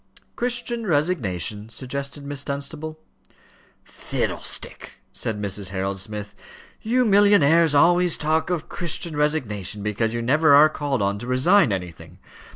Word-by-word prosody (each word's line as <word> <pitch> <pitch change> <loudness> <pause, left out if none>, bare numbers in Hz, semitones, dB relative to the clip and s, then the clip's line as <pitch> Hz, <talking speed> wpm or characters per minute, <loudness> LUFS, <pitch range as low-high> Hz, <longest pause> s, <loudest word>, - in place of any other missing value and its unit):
"Christian 240 -2 -3
resignation," 115 - -1
suggested 140 +3 -6
Miss 145 -1 -3
Dunstable. 150 +3 -6 0.8
"Fiddlestick!" - - -3
said 110 -2 -3
Mrs. 100 -1 -3
Harold 95 0 -3
Smith. 105 +1 -6 0.5
"You 250 +3 +1
millionnaires 170 -7 +4
always 175 +3 +4
talk 160 +2 0
of 175 -3 -2
Christian 170 -1 -2
resignation, 105 - -1
because 110 +2 -1
you 120 - -2
never 145 +4 +4
are 150 +2 +7
called 140 -7 -2
on 100 +1 -1
to 120 - -7
resign 135 - +3
anything. 90 -3 -6
140 Hz, 125 wpm, -23 LUFS, 105-165 Hz, 0.8 s, are